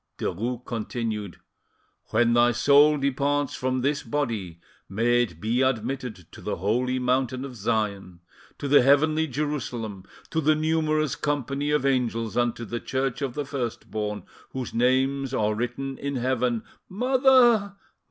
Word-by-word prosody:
Derues 120 +6 -3
continued— 110 -4 -4 0.7
"When 120 +1 +2
thy 120 0 +4
soul 145 +5 +5
departs 140 +1 0
from 130 0 -1
this 140 +2 0
body 110 - -3 0.3
may 120 +5 +2
it 85 -9 -3
be 115 +6 0
admitted 125 -5 -2
to - - -12
the - - -3
holy 125 +7 0
Mountain 130 +1 0
of 130 -2 -8
Sion, 100 -4 -2 0.4
to 145 - -4
the 145 0 +6
Heavenly 155 +4 +3
Jerusalem, 120 -8 -4 0.3
to 160 - 0
the 155 +1 +3
numerous 155 -2 +1
company 145 0 -2
of 150 -2 +1
Angels, 120 -4 0
and 120 -1 +1
to 120 - -7
the 120 +2 -4
Church 130 0 -2
of 135 -3 -3
the 145 -1 -2
First 130 -5 -5
born, 105 -1 -3 0.3
whose 130 -3 -5
names 130 +2 +1
are 105 -2 +1
written 125 +4 -4
in 140 0 -3
Heaven——" 125 -2 0 0.3
"Mother! 245 -2 +4
130 Hz, 145 wpm, -25 LUFS, 115-145 Hz, 0.7 s, the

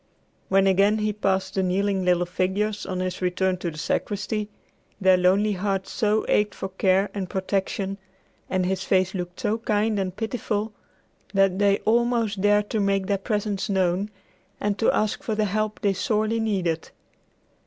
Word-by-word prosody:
When 195 0 +4
again 195 +3 +4
he 210 0 0
passed 190 -2 0
the 190 - +1
kneeling 190 +1 0
little 180 -1 +2
figures 200 +4 -1
on 185 -1 -2
his 185 0 -3
return 185 +1 +1
to 175 -1 -3
the 155 - -9
sacristy, 210 +5 -2 0.5
their 190 -1 +5
lonely 190 +4 +3
hearts 195 0 -2
so 215 0 +1
ached 210 0 +2
for 190 - -5
care 190 +1 +2
and 190 -3 -4
protection, 195 +1 -2 0.5
and 185 -1 0
his 190 0 -1
face 185 -1 +2
looked 180 -2 -5
so 220 +2 0
kind 215 -1 0
and 185 -1 -2
pitiful, 220 -1 -2 0.6
that 195 -1 +3
they 200 -1 +4
almost 230 -3 +1
dared 205 0 +3
to 220 - 0
make 195 -1 +1
their 200 0 0
presence 205 0 -2
known 190 +1 +1 0.5
and 205 0 -1
to 225 - +4
ask 215 +5 0
for 235 -7 -2
the 215 0 +1
help 215 +1 -2
they 200 -1 +2
sorely 215 +3 0
needed. 185 -7 -1
195 Hz, 165 wpm, -24 LUFS, 190-210 Hz, 0.6 s, their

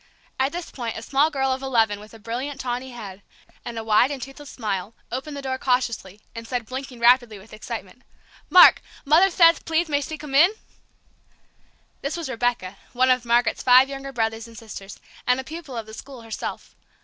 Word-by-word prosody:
At 265 +1 +2
this 350 0 -6
point, 235 -3 -5
a 225 - -7
small 280 +5 +2
girl 270 -3 0
of 260 - -5
eleven 225 -6 +1
with 210 +1 -13
a - - -11
brilliant, 245 +6 -5
tawny 250 0 -3
head, 205 -6 -9 0.4
and 235 -1 -6
a 225 - -3
wide 220 +3 +4
and 285 -2 -4
toothless 270 +3 -9
smile, 210 -2 -4 0.2
opened 285 +4 -5
the 280 - -7
door 260 -1 -3
cautiously, 235 -7 -1
and 230 0 -8
said, 245 -2 -3
blinking 255 +1 -7
rapidly 240 -2 +4
with 195 +3 -15
excitement, 215 - -7 0.5
"Mark, 365 - +8 0.2
Mother 325 +7 +5
theth 335 -2 +5
pleath 325 +1 0
may 285 -1 +1
thee 310 +2 -5
come 295 -2 -9
in?" 340 +9 +6 1.5
This 280 +4 -3
was 330 -5 -5
Rebecca, 230 -6 -1 0.2
one 255 +1 +3
of 250 -1 +1
Margaret's 235 0 +2
five 255 +2 +6
younger 275 0 -6
brothers 225 -2 -2
and 230 -1 -14
sisters, 205 -3 -9 0.3
and 250 +1 +3
a - - -4
pupil 310 -3 -8
of 225 - -4
the 220 - -12
school 260 0 -10
herself. 225 -1 -6
255 Hz, 195 wpm, -23 LUFS, 225-275 Hz, 1.5 s, Mark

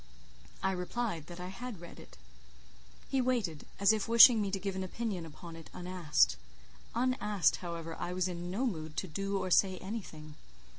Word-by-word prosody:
I 190 - +2
replied 180 -2 -3
that 175 0 -9
I 180 0 -5
had 235 +1 -7
read 170 0 -11
it. - - -14 0.9
He 270 - +1
waited, 230 - -1
as 200 +2 +6
if 215 -2 -1
wishing 235 0 +9
me 200 - -1
to 195 - -1
give 195 0 -3
an 190 - -2
opinion 185 -3 -4
upon 165 +2 -10
it 165 -1 -11
unasked. 170 - +2 0.6
Unasked, 210 -7 +2
however, 165 -2 -6
I 175 - -4
was 185 0 0
in 175 -1 -5
no 215 +9 -1
mood 160 -9 -4
to 190 - -1
do 195 +4 -2
or 185 -1 -3
say 190 0 +4
anything. 175 -7 -7
185 Hz, 180 wpm, -32 LUFS, 170-210 Hz, 0.9 s, wishing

